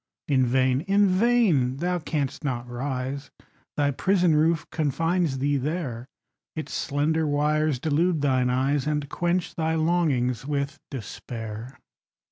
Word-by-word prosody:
In 130 -3 +3
vain 130 +1 +2
in 200 +1 +4
vain! 185 - +3
Thou 180 +3 -1
canst 150 -3 -3
not 125 -4 -2
rise: 130 +2 -4 0.5
Thy 145 -1 +2
prison 180 +3 +2
roof 160 +1 +2
confines 165 0 0
thee 140 +2 +1
there; 135 -4 -3 0.5
Its 155 - -5
slender 155 +2 0
wires 150 0 +1
delude 160 +4 +1
thine 130 -3 +2
eyes, 135 +3 +1
And 150 -1 -1
quench 175 0 -1
thy 160 0 0
longings 155 -8 +1
with 140 0 -2
despair. 115 0 -7
145 Hz, 125 wpm, -25 LUFS, 130-165 Hz, 0.5 s, in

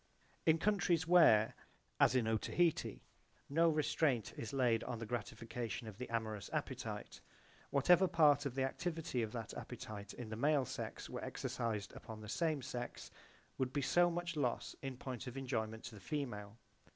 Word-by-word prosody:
/ - - -34
In 160 0 +6
countries 175 -4 +2
where, 160 -12 +7 0.5
as 130 - +5
in 120 -3 +3
Otaheite, 110 - +1 0.5
no 165 +4 +4
restraint 145 -7 +1
is 115 - -5
laid 125 -5 +2
on 120 - -3
the 115 - -5
gratification 115 +1 -4
of 105 -2 -9
the 125 - -5
amorous 110 -4 -2
appetite, - - -4 0.5
whatever 175 +7 +5
part 145 -4 +5
of 130 - -6
the 135 - +1
activity 160 -1 -2
of 110 -2 -2
that 115 -2 -5
appetite 110 -5 -7
in 120 -3 -7
the 110 - -4
male 140 +3 +3
sex - - -5
were - - -5
exercised 110 -4 -3
upon 110 -1 -9
the 105 - -9
same 155 -2 0
sex 120 -1 -5 0.5
would 130 -1 0
be 145 +1 -1
so 175 +6 +4
much 175 -1 -3
loss 125 -6 -1
in 135 -2 -5
point 130 0 -5
of 125 +2 -6
enjoyment 110 -4 -2
to 120 - -7
the 105 - -11
female. 115 -8 -4
125 Hz, 170 wpm, -37 LUFS, 110-155 Hz, 0.5 s, where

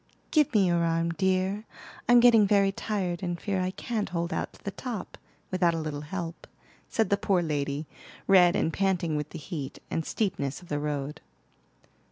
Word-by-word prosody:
"Give 305 -4 +4
me 200 -2 +5
your 175 -1 +2
arm, 165 0 +1
dear; 190 +4 0 0.4
I'm 245 0 +8
getting 230 -4 +7
very 200 -1 +4
tired, 190 -4 -2
and 175 -2 -3
fear 195 -1 -1
I 185 - 0
can't 215 +2 -3
hold 170 0 -2
out - - -2
to - - -19
the 200 - -3
top, 230 -3 -6 0.4
without 175 -2 +2
a - - -2
little 155 -2 -4
help," 170 +2 -6 0.4
said 225 -2 0
the 200 - +4
poor 190 -3 +1
lady, 145 -1 -2 0.4
red 180 -3 +6
and 160 - +1
panting 180 -5 +1
with 150 -1 -2
the - - -8
heat, 150 -4 -6
and 165 - 0
steepness 150 -9 -2
of 175 - -16
the 145 - -1
road. 145 -1 -3
175 Hz, 185 wpm, -28 LUFS, 160-200 Hz, 0.4 s, I'm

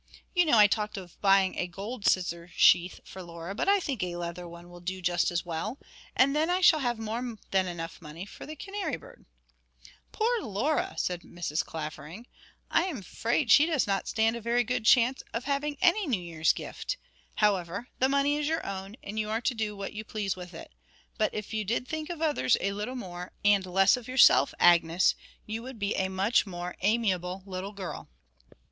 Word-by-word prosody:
You 355 -2 +4
know 295 -7 +4
I 210 - +9
talked 210 0 0
of 180 -3 -10
buying 195 -1 +4
a 180 - -1
gold 200 +5 -5
scissor 170 -2 0
sheath 175 +1 +4
for 190 - -10
Laura, 170 +1 -7
but 220 - 0
I 405 0 +5
think 275 - -3
a 180 -1 -2
leather 175 0 -5
one 170 +1 -11
will 175 - -11
do 185 +2 -4
just 175 -1 +1
as 175 0 -2
well. 175 +9 -4 0.4
And 275 +2 +4
then 315 +3 +2
I 360 +1 +2
shall 355 -4 +6
have 240 -4 -1
more 225 +1 -3 0.3
than 190 -1 +3
money - - -4 0.4
enough 175 +6 -8
for - - -10
the 310 - -7
canary 395 +5 -4
bird.' - - -16 0.9
'Poor 465 +1 +1
Laura!' 300 - -1
said 180 -1 -1
Mrs. 170 -3 -3
Clavering. 155 +6 -7 0.5
'I - - +4
am 355 -8 -3
afraid 230 - -1
she 300 - +7
does 310 -6 +1
not 195 -2 -1
stand 225 +1 +1
a 235 - -6
very 235 +2 +2
good 250 -2 -2
chance 250 +2 +5
of 230 - -2
having 285 +1 -1
any 370 +2 +3
New 240 -9 +1
Year's 165 -2 +1
gift. - - -5 0.4
However, 200 +2 0
the 260 - +3
money 280 +1 +2
is 295 -1 -1
your 320 +1 -1
own, 195 +1 -6
and 210 +2 -4
you 215 0 -2
are 220 +2 -1
to 255 - 0
do 215 -3 -3
what 195 0 -5
you 215 0 -5
please 210 -3 -3
with 180 -1 -10
it. - - -10 0.5
But 215 - +2
if 210 +1 -6
you 215 -1 -1
did 235 +5 -1
think 315 +2 -4
of 335 -2 -4
others 295 -5 +3
a 200 - -1
little 210 +6 -4
more, 180 -6 -7
and 205 -2 +5
less 195 +2 +4
of 245 -2 -9
yourself, 255 0 +6
Agnes, 170 0 +5 0.3
you 220 +1 -4
would 255 0 -8
be 205 -1 -1
a 190 - 0
much 195 +4 +2
more 175 -1 -5
amiable 190 -3 0
little 190 +1 -5
girl.' 195 -3 -7
210 Hz, 205 wpm, -28 LUFS, 180-255 Hz, 0.9 s, I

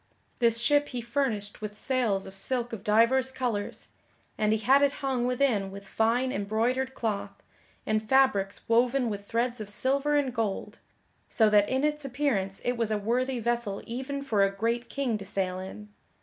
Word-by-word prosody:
This 230 -2 +3
ship 290 +4 +3
he 250 - -5
furnished 235 -5 -2
with 210 -1 -6
sails 230 -6 0
of 190 - -9
silk 240 +4 -2
of 210 - -6
divers 235 +5 +3
colors, 240 -6 -3 0.5
and 215 0 +1
he 220 - +3
had 260 +6 +4
it 285 -1 +3
hung 250 -2 0
within 250 -6 +1
with 200 +1 -10
fine 240 +4 +1
embroidered 235 +6 -1
cloth, 215 -4 -3 0.4
and 215 0 -1
fabrics 235 -8 +2
woven 240 +1 +2
with 200 0 -6
threads 235 0 -1
of 210 - -7
silver 275 +7 +1
and 275 -4 +1
gold, 220 -5 -3 0.5
so 220 -2 +3
that 205 -1 +4
in 260 +2 0
its 300 0 0
appearance 250 -8 -1
it 245 0 0
was 230 -2 0
a 215 - +1
worthy 245 +5 0
vessel 235 -3 -1
even 265 +4 -4
for 215 -7 +2
a 195 - +3
great 230 +4 -2
king 255 -6 -1
to - - -6
sail 185 -2 -1
in. 210 +3 -8
235 Hz, 180 wpm, -28 LUFS, 210-260 Hz, 0.5 s, had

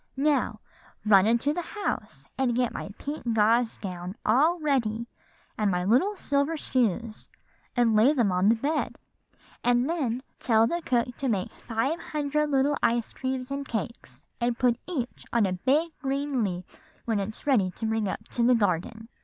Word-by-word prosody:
'Now 270 -6 +1 0.4
run 200 -1 +6
into 235 +6 +2
the 350 - -2
house, 410 +4 -4
and 255 -3 +1
get 245 -1 +1
my - - -5
pink 280 -6 -3
gauze 225 +2 +3
gown 180 -1 -6
all 300 +11 +4
ready, 235 -7 0 0.5
and 210 -1 +2
my 180 -1 0
little 260 - +3
silver 285 -1 0
shoes, 230 - -1 0.5
and 235 -3 +3
lay 225 +6 +6
them 240 -9 +2
on 180 +3 +3
the 230 - +5
bed; 295 +7 -1 0.7
and 245 +1 +3
then 260 -7 -1 0.2
tell 225 -2 +4
the 345 +8 -1
cook 245 -1 0
to 270 - -1
make 195 -5 -1
five 260 +9 -2
hundred 300 -1 -1
little 280 +1 +2
ice 235 -1 +1
creams 260 0 -3
and 280 0 -3
cakes 195 - -5
and 240 0 0
put 245 -1 +2
each 265 -9 -4
on 235 -3 +3
a 185 - 0
big 280 - +1
green 275 -2 -1
leaf 180 -2 -5 0.3
when 225 -3 0
it's 210 +2 -5
ready 235 -10 +3
to 205 +5 -6
bring 220 -1 0
up - - -5
to 240 - -2
the 245 +1 +5
garden. 220 +2 -1
240 Hz, 170 wpm, -27 LUFS, 215-280 Hz, 0.7 s, run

